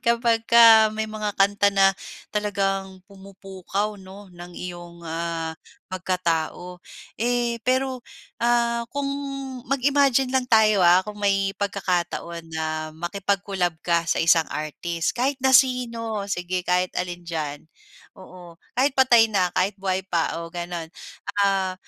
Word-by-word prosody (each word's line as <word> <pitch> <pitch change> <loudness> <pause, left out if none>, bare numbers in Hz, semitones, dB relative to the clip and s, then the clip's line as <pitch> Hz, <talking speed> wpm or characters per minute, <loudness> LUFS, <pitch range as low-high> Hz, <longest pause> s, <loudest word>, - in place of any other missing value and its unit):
kapagka 230 -1 +6
may 220 0 -2
mga 215 -1 -3
kanta 200 +1 +3
na 195 -1 +4 0.4
talagang 195 -2 -2
pumupukaw, 195 +1 -5
'no, 190 +1 -13
ng 175 0 -11
iyong, 175 -1 -8
ah, 165 0 -3 0.4
pagkatao. 180 -1 -2 0.4
Eh, 240 0 0
pero, 260 0 +1 0.4
ah, 235 0 +1
kung 280 -1 -1 0.6
mag-imagine 275 -1 +2
lang 260 -1 0
tayo, 220 -3 +4
ah, 180 0 +5
kung 210 +1 -9
may 195 -1 +1
pagkakataon 175 -4 -2
na 155 0 -3
makipag-collab 190 +1 -2
ka 170 -1 +1
sa - - +1
isang 165 -1 +4
artist, 165 +2 -3
kahit 260 +4 0
na 265 - +4
sino, 235 -4 +2
sige 180 -1 -2
kahit 180 0 0
alin 175 -1 -4
diyan. 155 -4 -5 0.5
Oo, 180 -2 -13 0.2
kahit 270 +1 +2
patay 245 -4 +5
na, 190 -5 +1
kahit 190 +2 +1
buhay 190 -1 -1
pa, 170 -2 -1
o 170 - -6
gano'n, 175 -1 -5 0.6
ah, 195 -2 +1
195 Hz, 125 wpm, -23 LUFS, 175-225 Hz, 0.6 s, kapagka